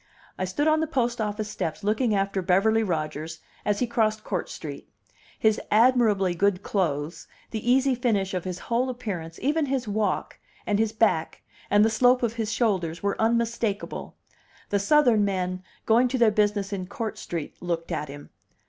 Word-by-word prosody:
I 185 Hz, -, -2 dB
stood 240 Hz, +12 st, -1 dB
on 310 Hz, 0 st, +4 dB
the 320 Hz, -, 0 dB
post 245 Hz, -5 st, 0 dB
office 210 Hz, 0 st, -2 dB
steps 170 Hz, -2 st, -4 dB
looking 215 Hz, +2 st, +1 dB
after 195 Hz, 0 st, 0 dB
Beverly 200 Hz, +5 st, +3 dB
Rodgers 160 Hz, -4 st, -3 dB, 0.2 s
as 210 Hz, -1 st, +1 dB
he 250 Hz, -, +1 dB
crossed 220 Hz, -2 st, 0 dB
Court -, -, -3 dB
Street. -, -, -8 dB, 0.5 s
His 220 Hz, -1 st, +2 dB
admirably 215 Hz, -5 st, +4 dB
good 200 Hz, +2 st, +1 dB
clothes, 165 Hz, -4 st, -2 dB, 0.2 s
the 225 Hz, +2 st, 0 dB
easy 265 Hz, +1 st, +4 dB
finish 215 Hz, -6 st, 0 dB
of 180 Hz, -2 st, -2 dB
his 180 Hz, -1 st, -4 dB
whole 245 Hz, +2 st, 0 dB
appearance, 195 Hz, -10 st, -5 dB
even 295 Hz, +2 st, +1 dB
his 260 Hz, -3 st, -1 dB
walk, 205 Hz, -2 st, -1 dB, 0.3 s
and 205 Hz, 0 st, +1 dB
his 220 Hz, -1 st, +2 dB
back, 220 Hz, -7 st, 0 dB, 0.3 s
and 205 Hz, +1 st, +5 dB
the -, -, +3 dB
slope 250 Hz, +3 st, +4 dB
of 230 Hz, -2 st, +1 dB
his 225 Hz, -2 st, -2 dB
shoulders, 185 Hz, -9 st, 0 dB
were 200 Hz, +1 st, -1 dB
unmistakable. 230 Hz, -2 st, -1 dB, 0.5 s
The 200 Hz, -, +1 dB
Southern 240 Hz, -1 st, +4 dB
men, 185 Hz, -2 st, -1 dB, 0.2 s
going 235 Hz, +3 st, +4 dB
to 260 Hz, +1 st, -1 dB
their 230 Hz, -3 st, +5 dB
business 205 Hz, -1 st, +1 dB
in 185 Hz, -2 st, -4 dB
Court 215 Hz, +2 st, -5 dB
Street, 165 Hz, -4 st, -6 dB
looked 170 Hz, -1 st, -3 dB
at 150 Hz, -3 st, -3 dB
him. 145 Hz, +1 st, -10 dB
210 Hz, 175 wpm, -26 LUFS, 185-235 Hz, 0.5 s, and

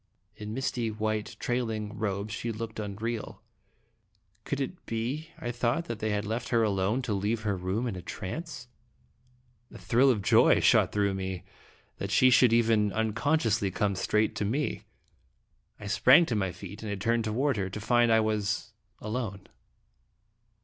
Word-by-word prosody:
In 105 Hz, 0 st, -7 dB
misty 125 Hz, -3 st, -1 dB
white 110 Hz, 0 st, -2 dB
trailing 110 Hz, -4 st, -2 dB
robe, 100 Hz, 0 st, -3 dB
she 115 Hz, +1 st, -3 dB
looked 110 Hz, 0 st, -6 dB
unreal. 105 Hz, 0 st, -5 dB, 1.0 s
Could 140 Hz, -, -2 dB
it 140 Hz, +6 st, -4 dB
be, 125 Hz, +8 st, -3 dB
I 120 Hz, -, -4 dB
thought, 120 Hz, +7 st, 0 dB
that 115 Hz, -7 st, -5 dB
they 110 Hz, -, -1 dB
had 105 Hz, 0 st, -1 dB
left 115 Hz, +3 st, -3 dB
her 115 Hz, -2 st, +3 dB
alone 105 Hz, +4 st, 0 dB
to 110 Hz, -, -1 dB
leave 105 Hz, +3 st, -1 dB
her 105 Hz, -2 st, 0 dB
room 95 Hz, +6 st, -2 dB
in 115 Hz, -6 st, -3 dB
a 90 Hz, -, -6 dB
trance? 120 Hz, -, -6 dB, 1.0 s
A -, -, -10 dB
thrill 130 Hz, +4 st, +3 dB
of 110 Hz, -6 st, +1 dB
joy -, -, +5 dB
shot -, -, +4 dB
through 100 Hz, -1 st, +1 dB
me 95 Hz, -1 st, -4 dB, 0.5 s
that 100 Hz, -, -4 dB
she 130 Hz, +6 st, +5 dB
should 125 Hz, -1 st, +6 dB
even 115 Hz, -2 st, +3 dB
uncon 110 Hz, +9 st, +1 dB
sciously 105 Hz, -6 st, 0 dB
come 100 Hz, +1 st, 0 dB
straight 105 Hz, +3 st, +1 dB
to -, -, -1 dB
me. 135 Hz, +9 st, -2 dB, 0.9 s
I 105 Hz, -, -9 dB
sprang 130 Hz, +10 st, +6 dB
to 120 Hz, -, -2 dB
my 95 Hz, -3 st, 0 dB
feet 100 Hz, +4 st, -10 dB
and 100 Hz, -3 st, -4 dB
turned 115 Hz, +2 st, +1 dB
toward 125 Hz, +4 st, 0 dB
her 95 Hz, -1 st, -2 dB
to 100 Hz, -, -6 dB
find 120 Hz, +2 st, +3 dB
I 110 Hz, 0 st, +5 dB
was 105 Hz, 0 st, -1 dB, 0.2 s
alone! 105 Hz, -3 st, -4 dB
110 Hz, 165 wpm, -28 LUFS, 100-120 Hz, 1.0 s, should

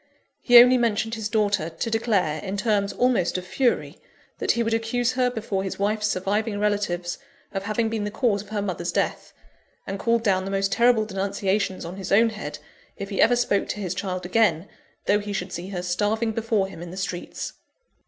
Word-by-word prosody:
He 245 Hz, -1 st, +7 dB
only 250 Hz, +1 st, +8 dB
mentioned 225 Hz, -1 st, 0 dB
his 220 Hz, -2 st, -3 dB
daughter, 205 Hz, -6 st, +1 dB
to 170 Hz, +8 st, -4 dB
declare, 200 Hz, -9 st, +1 dB
in 195 Hz, 0 st, -4 dB
terms 205 Hz, -2 st, +1 dB
almost 240 Hz, -9 st, +1 dB
of 180 Hz, -, -5 dB
fury, 245 Hz, +6 st, 0 dB, 0.4 s
that -, -, +2 dB
he 235 Hz, -, 0 dB
would 225 Hz, 0 st, -1 dB
accuse 230 Hz, +2 st, 0 dB
her 255 Hz, -1 st, +1 dB
before 220 Hz, -5 st, -3 dB
his 190 Hz, -, -4 dB
wife's 210 Hz, +1 st, 0 dB
surviving 205 Hz, +2 st, -1 dB
relatives, 200 Hz, -4 st, -1 dB, 0.3 s
of 195 Hz, 0 st, -4 dB
having 220 Hz, +2 st, 0 dB
been 220 Hz, -1 st, -2 dB
the 205 Hz, -, -2 dB
cause 210 Hz, -2 st, 0 dB
of 205 Hz, -, -14 dB
her 210 Hz, -2 st, -2 dB
mother's 180 Hz, -3 st, -3 dB
death; -, -, -2 dB, 0.5 s
and 195 Hz, 0 st, -4 dB
called 230 Hz, +1 st, +1 dB
down 190 Hz, -4 st, +2 dB
the 195 Hz, -, -4 dB
most 195 Hz, 0 st, 0 dB
terrible 235 Hz, -2 st, +4 dB
denunciations 195 Hz, -1 st, -1 dB
on 175 Hz, +3 st, -7 dB
his 195 Hz, -, -6 dB
own 225 Hz, +4 st, +5 dB
head, 150 Hz, -9 st, -6 dB, 0.4 s
if 200 Hz, -, -6 dB
he 195 Hz, -, +1 dB
ever 245 Hz, +2 st, +5 dB
spoke 240 Hz, -4 st, +1 dB
to -, -, -3 dB
his 185 Hz, -3 st, -2 dB
child 185 Hz, -1 st, -4 dB
again, 185 Hz, -3 st, +2 dB, 0.4 s
though 205 Hz, -, +3 dB
he 205 Hz, 0 st, -5 dB
should 190 Hz, -1 st, -4 dB
see 175 Hz, +2 st, -5 dB
her 180 Hz, -3 st, -4 dB
starving 210 Hz, +5 st, 0 dB
before 220 Hz, -2 st, 0 dB
him 180 Hz, -, -10 dB
in 175 Hz, -, -7 dB
the 180 Hz, -, -9 dB
streets. 180 Hz, -2 st, -4 dB
205 Hz, 205 wpm, -24 LUFS, 190-225 Hz, 0.5 s, only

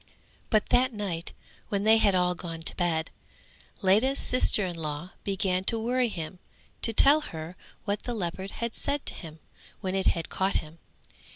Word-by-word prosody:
But 215 Hz, -2 st, +2 dB
that 255 Hz, +1 st, +4 dB
night 185 Hz, -6 st, -4 dB, 0.4 s
when 200 Hz, -1 st, 0 dB
they 220 Hz, +1 st, +6 dB
had 200 Hz, -3 st, +4 dB
all 180 Hz, 0 st, +3 dB
gone 165 Hz, -2 st, -6 dB
to -, -, -1 dB
bed, 165 Hz, -2 st, 0 dB, 0.7 s
Ledha's 220 Hz, +9 st, +4 dB
sister 245 Hz, -5 st, +3 dB
in 175 Hz, -2 st, -4 dB
law 160 Hz, +2 st, -4 dB
began 190 Hz, -2 st, 0 dB
to 230 Hz, -, +2 dB
worry 245 Hz, +2 st, +1 dB
him 175 Hz, -1 st, -6 dB, 0.4 s
to 230 Hz, -, +3 dB
tell 280 Hz, +7 st, +6 dB
her 165 Hz, -, -7 dB, 0.3 s
what 205 Hz, 0 st, -1 dB
the 245 Hz, -, -4 dB
leopard 190 Hz, -1 st, -3 dB
had 235 Hz, +2 st, -4 dB
said 285 Hz, 0 st, -2 dB
to -, -, -3 dB
him, 160 Hz, -3 st, -9 dB, 0.4 s
when 185 Hz, -1 st, -2 dB
it 195 Hz, 0 st, +1 dB
had 165 Hz, -2 st, +1 dB
caught 190 Hz, +1 st, 0 dB
him. 155 Hz, +2 st, -3 dB
190 Hz, 175 wpm, -28 LUFS, 170-225 Hz, 0.7 s, they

